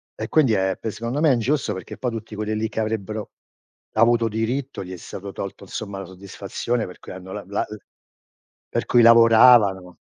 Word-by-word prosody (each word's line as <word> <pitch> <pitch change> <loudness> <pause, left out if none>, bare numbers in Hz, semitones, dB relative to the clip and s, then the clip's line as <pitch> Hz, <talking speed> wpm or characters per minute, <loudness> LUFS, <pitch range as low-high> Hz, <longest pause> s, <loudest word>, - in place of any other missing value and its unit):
E - - -5
quindi 135 -8 +3
è 95 -1 0
secondo 115 +4 -3
me 155 -4 +5
ingiusto 120 -1 0
perché 95 - -8
poi 125 - -2
tutti 115 -1 -7
quelli 105 +1 -3
lì 110 +1 -2
che - - -5
avrebbero 110 -1 -3 0.6
avuto 115 +1 +3
diritto, 120 +4 -3
gli 90 - -9
è - - -7
stato 100 +3 -8
tolto, 100 0 -7
insomma, 100 +1 -6
la 95 - -6
soddisfazione 100 +5 -4
per 90 - -11
cui - - -11
hanno 95 0 -10
la 105 - -6
la 100 +1 -2 1.0
per - - -2
cui 120 - +4
lavoravano. 115 -5 +6
110 Hz, 180 wpm, -22 LUFS, 100-115 Hz, 1.0 s, lavoravano